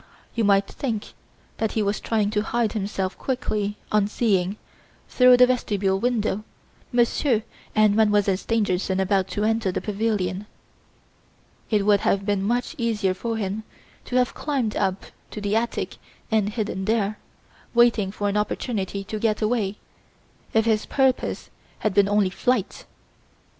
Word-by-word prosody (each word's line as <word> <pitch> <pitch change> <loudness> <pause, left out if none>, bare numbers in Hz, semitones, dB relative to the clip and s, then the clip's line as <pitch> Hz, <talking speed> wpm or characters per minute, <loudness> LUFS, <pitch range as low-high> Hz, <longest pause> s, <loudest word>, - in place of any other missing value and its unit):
"You 230 - 0
might 200 -1 +4
think 225 -4 -4 0.4
that 220 -1 -1
he 220 - +1
was 200 +1 0
trying 215 -2 0
to 210 -1 +1
hide 225 0 0
himself 195 -3 -2
quickly 215 -6 -2
on 210 -1 +3
seeing, 200 -3 +1 0.5
through 250 -1 +6
the 250 - +8
vestibule 205 -6 0
window, 220 -3 0 0.5
Monsieur 240 -1 +2 0.3
and 215 -1 +4
Mademoiselle 210 -3 +3
Stangerson 190 -3 0
about 190 0 +1
to 205 +3 -2
enter 220 -3 +1
the - - -2
pavilion. 205 -2 -2 1.2
It 210 -3 +2
would 205 -1 +5
have 195 0 +1
been 205 -2 +1
much 240 - -1
easier 215 -5 +1
for 225 +4 -3
him 205 0 -2 0.4
to 245 - -5
have 250 -1 +2
climbed 265 -8 -2
up 190 -1 -1 0.2
to - - -7
the 205 0 -1
attic 235 +1 -1 0.3
and 215 -2 +2
hidden 205 -3 -3
there, 215 -1 0 0.6
waiting 230 -5 +4
for 205 0 -2
an 200 +1 0
opportunity 200 -2 -2
to 215 +2 -5
get 215 -1 +1
away, 215 -3 0 0.8
if 225 0 +3
his 220 -2 +1
purpose 265 -2 0 0.3
had 215 - -1
been 200 0 +4
only 205 -2 +2
flight. 245 -1 -1
210 Hz, 150 wpm, -24 LUFS, 200-230 Hz, 1.2 s, the